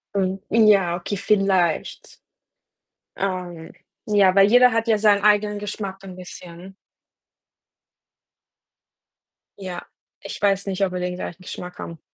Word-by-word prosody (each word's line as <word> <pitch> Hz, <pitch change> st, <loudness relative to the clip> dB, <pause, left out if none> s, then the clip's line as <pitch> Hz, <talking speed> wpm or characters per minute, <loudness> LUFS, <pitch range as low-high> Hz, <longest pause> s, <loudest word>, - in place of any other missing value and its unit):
Hm, 190 Hz, 0 st, -1 dB
ja, 205 Hz, -6 st, +4 dB
okay, 185 Hz, +3 st, -5 dB
vielleicht. 195 Hz, -5 st, 0 dB, 1.0 s
Ähm, 180 Hz, -4 st, -4 dB, 0.3 s
ja, 200 Hz, -3 st, +3 dB
weil 195 Hz, 0 st, +6 dB
jeder 250 Hz, +2 st, +6 dB
hat 225 Hz, +1 st, -1 dB
ja 220 Hz, -2 st, +3 dB
seinen 205 Hz, -1 st, +3 dB
eigenen 210 Hz, 0 st, +2 dB
Geschmack 195 Hz, -2 st, -6 dB
'n 185 Hz, -2 st, -10 dB
bisschen. 180 Hz, 0 st, -11 dB, 2.8 s
Ja. 185 Hz, -3 st, -7 dB, 0.4 s
Ich -, -, -8 dB
weiß 195 Hz, -1 st, +1 dB
nicht, 195 Hz, 0 st, -1 dB
ob 185 Hz, -, -5 dB
wir 180 Hz, -, -3 dB
den 180 Hz, 0 st, -3 dB
gleichen 180 Hz, 0 st, -7 dB
Geschmack 180 Hz, 0 st, -8 dB
haben. 165 Hz, -1 st, -8 dB
195 Hz, 125 wpm, -22 LUFS, 180-205 Hz, 2.8 s, weil